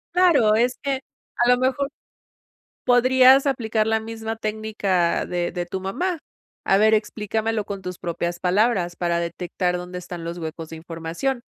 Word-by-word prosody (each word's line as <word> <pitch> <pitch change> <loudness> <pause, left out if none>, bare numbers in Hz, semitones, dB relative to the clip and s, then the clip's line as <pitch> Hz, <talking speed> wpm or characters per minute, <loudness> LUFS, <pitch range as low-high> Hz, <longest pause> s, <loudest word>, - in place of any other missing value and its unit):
Claro, 325 -12 +5
es 245 +3 +1
que 275 -2 -1 0.4
a 240 +1 +3
lo 250 - +6
mejor 260 +2 0 1.0
podrías 255 +2 +6
aplicar 220 -4 0
la 220 0 +2
misma 225 0 -5
técnica 210 -5 0
de 175 -1 -2
de 175 0 -4
tu 190 +2 -4
mamá. 335 - -2 0.5
"A 195 - +4
ver, 220 +1 +5
explícamelo 215 0 -1
con 200 -1 -6
tus 180 -1 -6
propias 170 0 -3
palabras", 185 -1 +1
para 170 -1 0
detectar 180 +1 -2
dónde 180 0 -6
están 175 -1 -8
los 170 +1 -5
huecos 160 0 -6
de 160 - -8
información. 165 +10 -4
210 Hz, 155 wpm, -23 LUFS, 175-240 Hz, 1.0 s, lo